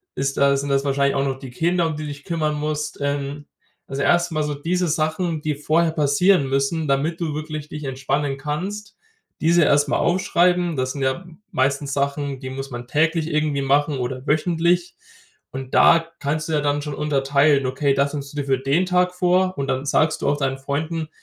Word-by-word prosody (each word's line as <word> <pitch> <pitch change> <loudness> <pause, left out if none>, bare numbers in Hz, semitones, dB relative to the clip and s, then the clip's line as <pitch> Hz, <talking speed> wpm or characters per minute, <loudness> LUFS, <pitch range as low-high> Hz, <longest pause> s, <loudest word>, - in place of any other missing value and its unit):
ist 135 0 -1
das 140 0 +3
sind 140 - -3
das 140 0 +1
wahrscheinlich 140 0 +1
auch 135 - +1
noch 135 -1 -2
die 135 -2 -8
Kinder, 170 +6 +1
um 160 - -3
die 155 - -6
du 150 - -5
dich 145 0 -9
kümmern 155 -3 -1
musst, 150 0 -3
ähm 140 +1 -3 0.4
Also 135 +1 -4
erstmal 170 -1 +2
so 150 0 -2
diese 175 +4 -1
Sachen, 160 +1 -1
die 150 -1 -1
vorher 160 +3 +1
passieren 150 0 +3
müssen, 140 +4 0
damit 155 +5 0
du 155 -3 -1
wirklich 155 0 -5
dich 150 -1 -7
entspannen 135 +1 -2
kannst- 185 +9 -5 0.4
diese 170 +1 +4
erstmal 145 0 +3
aufschreiben. 175 -1 +2
Das 130 0 -1
sind 140 - -6
ja 135 +7 -1 0.3
meistens 140 +1 0
Sachen, 140 0 -2
die 130 -1 -6
muss 135 +1 -6
man 120 0 -7
täglich 160 +2 +1
irgendwie 150 -3 0
machen 145 +1 +2
oder 130 +1 -4
wöchentlich. 170 +3 +1 0.6
Und 135 -1 -7
da 165 0 +5
kannst 155 +2 -2
du - - -1
ja 150 - +2
dann 145 0 0
schon 150 -1 -5
unterteilen. 140 -1 +2
Okay, 135 +2 +1
das 140 +1 +1
nimmst 140 -1 -6
du - - -9
dir 140 - -2
für 135 -1 +2
den 145 +8 +1
Tag 180 0 +2
vor. 185 +1 +2
Und 140 - -2
dann 130 +1 -1
sagst 155 +2 +1
du - - -1
auch 145 - +1
deinen 135 -1 -1
Freunden: 155 +4 -3
145 Hz, 200 wpm, -22 LUFS, 140-160 Hz, 0.6 s, da